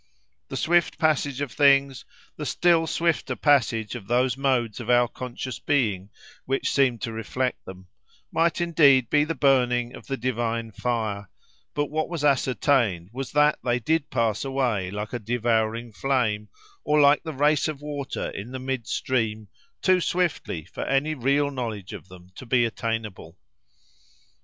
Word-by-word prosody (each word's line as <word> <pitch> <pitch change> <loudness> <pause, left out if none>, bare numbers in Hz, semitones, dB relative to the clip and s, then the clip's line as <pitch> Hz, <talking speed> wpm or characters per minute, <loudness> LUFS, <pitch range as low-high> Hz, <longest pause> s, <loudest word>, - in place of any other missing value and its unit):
The - - -5
swift 175 0 +2
passage 145 -4 +1
of 145 - -3
things, 140 -2 +3 0.3
the - - -6
still 170 -2 +3
swifter 160 -5 0
passage 120 -7 +2
of 115 -6 -8
those 125 +1 +2
modes 130 -5 0
of 120 -1 -7
our 120 0 +5
conscious 125 -1 -6
being 105 -9 0 0.4
which 135 +1 -1
seemed 130 -5 +2
to 115 - -2
reflect 125 +3 -3
them, 95 0 -10 0.5
might 165 0 +1
indeed 145 -8 +4
be 150 0 +4
the 165 +1 -3
burning 125 -3 +2
of - - -13
the 135 - -2
divine 115 -2 -2
fire: 110 -4 -3 0.5
but 145 -1 -1
what 155 +1 -1
was 170 -4 -4
ascertained 125 - +1
was 135 +1 -5
that 150 +1 +3
they 120 -1 +1
did 155 +5 0
pass 115 -4 0
away 125 -9 -1
like 105 +4 -5
a 120 - -2
devouring 115 0 -1
flame, 110 -5 0 0.3
or 150 0 +2
like 145 0 +5
the 160 - -5
race 145 +1 +2
of 155 -3 -4
water 145 -2 -4
in 105 +4 -7
the 130 - -4
mid 130 -2 -4
stream—too 115 - -1
swiftly 170 - -1
for - - -6
any 135 +3 0
real 140 +1 +1
knowledge 115 -8 -5
of - - -9
them 90 -1 -15
to 130 - -11
be 120 0 +3
attainable. 110 -6 -4
125 Hz, 155 wpm, -25 LUFS, 115-145 Hz, 0.5 s, our